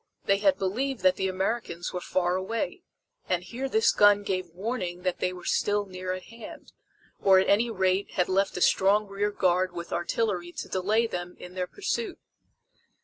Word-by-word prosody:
They 195 0 +3
had 195 -2 +3
believed 230 +6 -2
that 185 -1 +5
the 190 - -1
Americans 190 -2 -2
were 180 - -3
far 180 0 0
away, 230 - -3 0.5
and 180 -1 +1
here 255 +9 -4
this 220 -3 +4
gun 205 0 +5
gave 185 -3 -2
warning 180 -1 -4
that 185 -1 -1
they 180 - 0
were 180 -1 -10
still 205 0 +1
near 185 -1 -5
at 185 0 -6
hand, 230 +1 -12 0.5
or 190 -1 +6
at 190 - +3
any 225 +4 +3
rate 190 -2 0
had 180 - +1
left 195 +1 +1
a - - -3
strong 200 +4 +4
rear 200 +1 -1
guard 185 -2 +1
with 170 -1 -6
artillery 175 0 -1
to - - -6
delay 210 +5 +1
them 180 -5 -5
in 180 - -10
their 180 -1 -2
pursuit. 410 - -3
190 Hz, 185 wpm, -27 LUFS, 180-210 Hz, 0.5 s, or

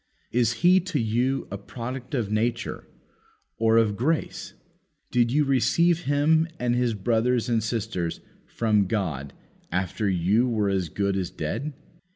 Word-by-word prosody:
Is 120 -1 +2
he 185 +1 +7
to 185 -4 -2
you 125 +4 0
a 100 - -4
product 125 +6 -6
of 110 -5 -1
nature, 115 +3 -1 0.7
or 115 0 +4
of 110 -3 +3
grace? 155 +9 -2 0.6
Did 120 -1 +2
you 150 +2 +3
receive 165 +6 +2
him 155 +3 +3
and 120 0 +1
his 120 -2 +1
brothers 120 +3 +1
and 115 -2 +1
sisters 100 -7 -2 0.3
from 105 -4 +1
God 80 - -2 0.4
after 90 +3 -1
you 95 +7 +2
were 105 -4 +1
as 95 -4 -1
good 100 +3 -1
as 95 -3 -2
dead? 140 - -4
115 Hz, 145 wpm, -25 LUFS, 100-130 Hz, 0.7 s, he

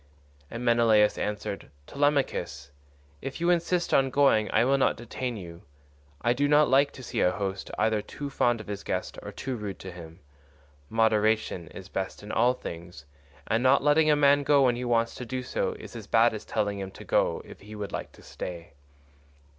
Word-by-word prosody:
And 120 +1 -6
Menelaus 115 -3 +4
answered, 105 -4 -4 0.2
"Telemachus, 140 - -1 0.5
if 135 - -6
you 170 +1 +2
insist 175 0 0
on 135 0 +4
going 130 -6 +3
I 115 - +3
will 135 +1 +3
not - - +2
detain 120 +1 -5
you. 85 -3 -9 0.6
I 120 - +2
do 140 +3 +1
not 150 0 +5
like 140 +2 +4
to 130 - -11
see - - -2
a - - +4
host 95 0 -4
either 110 -1 +1
too 140 +6 -7
fond 120 -3 +1
of 110 - -8
his 100 -1 -6
guest - - -3
or - - -7
too 130 -1 -4
rude 105 -4 -5
to 95 - -8
him. 85 -2 -11 0.7
Moderation 110 -5 +1
is 95 - -10
best 95 +1 -5
in 105 - -7
all 120 +3 +3
things, 85 - -9 0.4
and 115 +1 +1
not 130 +2 +4
letting 150 +2 +4
a 150 - +5
man 145 0 +4
go 140 0 +4
when 125 -2 +3
he 125 - -4
wants 115 -1 +1
to - - -7
do 125 +1 -4
so 125 - -2
is - - -11
as 110 -3 -8
bad 115 +1 +4
as 110 - -7
telling 105 -2 -1
him 95 -1 -5
to 95 - -12
go - - +1
if - - -12
he 105 +2 -10
would 105 -1 -5
like - - -5
to - - -17
stay. 85 -3 -8
115 Hz, 200 wpm, -27 LUFS, 100-135 Hz, 0.7 s, not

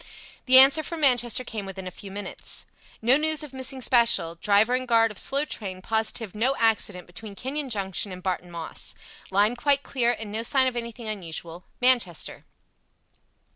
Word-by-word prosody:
The 260 0 +8
answer 270 +4 +8
from 320 +1 -6
Manchester 245 -3 +2
came 215 -5 -7
within 190 -1 -8
a 185 - -6
few 195 - -11
minutes. 200 +1 -5 0.4
"No 250 +4 +5
news 310 0 +1
of 290 -3 -8
missing 260 0 -1
special. 235 -10 +3
Driver 205 +6 +2
and 255 0 -1
guard 225 -1 +3
of 210 - -5
slow 280 +2 0
train 190 -9 -6
positive 220 -1 -1
no 245 +6 0
accident 215 -6 0
between 200 +3 -9
Kenyon 270 +5 -4
Junction 195 -2 0
and 185 0 -9
Barton 180 -1 -3
Moss. 170 -2 -4 0.3
Line 205 +5 +3
quite 280 +3 +1
clear, 240 -2 0
and 215 -2 -8
no 220 +2 -1
sign 260 +3 +3
of 255 -1 -1
anything 235 -1 -6
unusual. 175 -4 -6
Manchester." 245 -10 +1
225 Hz, 175 wpm, -25 LUFS, 195-260 Hz, 0.4 s, The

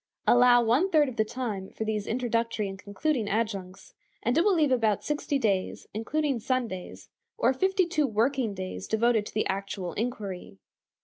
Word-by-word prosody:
Allow 245 0 +6
one 255 +12 +3
third 305 -6 +4
of 250 - -8
the 220 - +4
time 215 -5 -4
for - - -5
these 215 -2 -2
introductory 230 -3 -1
and 195 0 -7
concluding 215 +3 -1
adjuncts, 195 -4 -3 0.3
and 240 +3 +1
it 330 - +4
will 400 -1 +3
leave 300 -4 +3
about 220 -5 +2
sixty 295 -1 -1
days, 200 -7 -1
including 275 +5 -1
Sundays, 230 -7 -3 0.3
or 450 - +3
fifty 380 +6 +2
two 310 -4 +1
working 230 0 0
days 185 0 -6
devoted 220 -1 +2
to - - -10
the 215 - +1
actual 195 -2 -3
inquiry. 205 - -4
230 Hz, 170 wpm, -28 LUFS, 205-265 Hz, 0.3 s, Allow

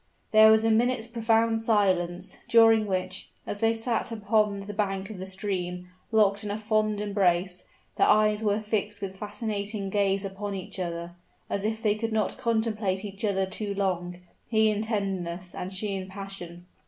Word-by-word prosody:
There 220 0 +8
was 220 0 +5
a 225 - +3
minute's 235 +1 +2
profound 230 -1 +2
silence 190 -5 +1
during 225 -2 +6
which, 185 -1 -3 0.2
as 205 - -4
they 225 +1 +3
sat 230 +1 0
upon 210 -2 +1
the 205 +1 -7
bank 195 -1 -2
of 200 - -8
the 190 - -6
stream, 180 -2 -4 0.2
locked 205 -2 +3
in 210 - -4
a 205 - -2
fond 215 -1 0
embrace, 185 -3 +1 0.3
their - - +4
eyes 215 0 +4
were 210 -1 +1
fixed 210 -1 -2
with 190 -1 -4
fascinating 205 -1 -3
gaze 195 -1 +1
upon 200 +1 -4
each 190 0 -7
other, 170 -1 -4 0.4
as 200 - -1
if 220 +1 -2
they 210 -2 +4
could 225 +2 -3
not 220 +3 -1
contemplate 220 -5 0
each 200 0 -8
other 195 -2 +1
too 200 +1 -4
long 180 -3 -1 0.3
he 220 -1 +4
in 210 0 -1
tenderness, 190 -5 -3
and 180 - -5
she 200 +1 -2
in 190 -1 -4
passion. 190 -3 -8
205 Hz, 175 wpm, -27 LUFS, 190-220 Hz, 0.4 s, There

